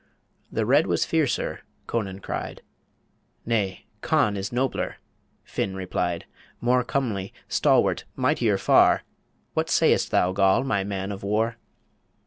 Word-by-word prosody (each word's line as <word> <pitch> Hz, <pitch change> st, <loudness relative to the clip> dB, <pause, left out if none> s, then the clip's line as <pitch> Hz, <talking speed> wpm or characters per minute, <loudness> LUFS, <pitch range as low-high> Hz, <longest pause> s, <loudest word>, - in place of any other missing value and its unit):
"The 110 Hz, -, 0 dB
Red 140 Hz, +7 st, +4 dB
was -, -, +1 dB
fiercer," 155 Hz, -7 st, 0 dB, 0.3 s
Conan 100 Hz, -4 st, -3 dB
cried -, -, -5 dB, 0.8 s
"Nay, 105 Hz, -5 st, -1 dB, 0.2 s
Conn 105 Hz, -, +2 dB
is 100 Hz, 0 st, -4 dB
nobler," 130 Hz, +2 st, -1 dB, 0.5 s
Finn 95 Hz, -1 st, -3 dB
replied, 90 Hz, -2 st, -2 dB, 0.3 s
"More 125 Hz, +1 st, +2 dB
comely, 115 Hz, -8 st, -2 dB, 0.2 s
stalwart, -, -, +2 dB
mightier 125 Hz, -6 st, +2 dB
far -, -, +4 dB, 0.5 s
What -, -, 0 dB
sayest -, -, +3 dB
thou, 90 Hz, -, +2 dB
Goll, 95 Hz, +4 st, +3 dB
my 100 Hz, -8 st, 0 dB
man 95 Hz, 0 st, -3 dB
of 100 Hz, -, -6 dB
war?" 110 Hz, +3 st, 0 dB
105 Hz, 120 wpm, -25 LUFS, 95-120 Hz, 0.8 s, Red